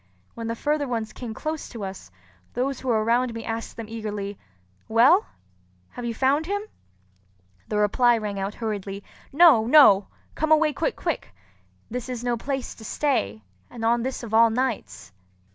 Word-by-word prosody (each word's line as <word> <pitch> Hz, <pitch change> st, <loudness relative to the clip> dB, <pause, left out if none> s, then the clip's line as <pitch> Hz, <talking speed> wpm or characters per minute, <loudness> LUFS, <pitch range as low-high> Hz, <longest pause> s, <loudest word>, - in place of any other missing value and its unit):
When 230 Hz, -1 st, -6 dB
the 230 Hz, -, -2 dB
further 295 Hz, +3 st, -1 dB
ones 225 Hz, -3 st, -3 dB
came 230 Hz, -3 st, -7 dB
close 310 Hz, +4 st, -4 dB
to 230 Hz, -4 st, -7 dB
us, 190 Hz, -, -8 dB, 0.5 s
those 260 Hz, +2 st, -1 dB
who 265 Hz, -, -8 dB
were 220 Hz, -3 st, +2 dB
around 235 Hz, +1 st, +1 dB
me 230 Hz, -, -6 dB
asked 225 Hz, 0 st, -5 dB
them 230 Hz, -, -5 dB
eagerly, 210 Hz, -3 st, -5 dB, 0.5 s
"Well, 255 Hz, -, +5 dB, 0.6 s
have 245 Hz, -, -7 dB
you 230 Hz, -1 st, -3 dB
found 280 Hz, +6 st, +2 dB
him?" 405 Hz, +1 st, -1 dB, 1.0 s
The 210 Hz, -, -2 dB
reply 235 Hz, +3 st, +3 dB
rang 205 Hz, -2 st, -4 dB
out 195 Hz, +2 st, -3 dB
hurriedly, 205 Hz, -3 st, -4 dB, 0.3 s
"No! 285 Hz, -8 st, +6 dB
no! 220 Hz, -9 st, +7 dB, 0.3 s
Come 315 Hz, 0 st, -1 dB
away 310 Hz, -1 st, +4 dB
quick -, -, -1 dB
quick! -, -, -3 dB, 0.6 s
This 250 Hz, +1 st, -4 dB
is 245 Hz, -2 st, -4 dB
no 245 Hz, -1 st, 0 dB
place 265 Hz, +2 st, -4 dB
to 225 Hz, -, -14 dB
stay, 110 Hz, -, -1 dB, 0.3 s
and 225 Hz, -2 st, -6 dB
on 235 Hz, +1 st, +3 dB
this 260 Hz, +1 st, -4 dB
of 225 Hz, -2 st, -7 dB
all 230 Hz, +1 st, +6 dB
nights!" 245 Hz, -, -3 dB
235 Hz, 170 wpm, -25 LUFS, 220-265 Hz, 1.0 s, no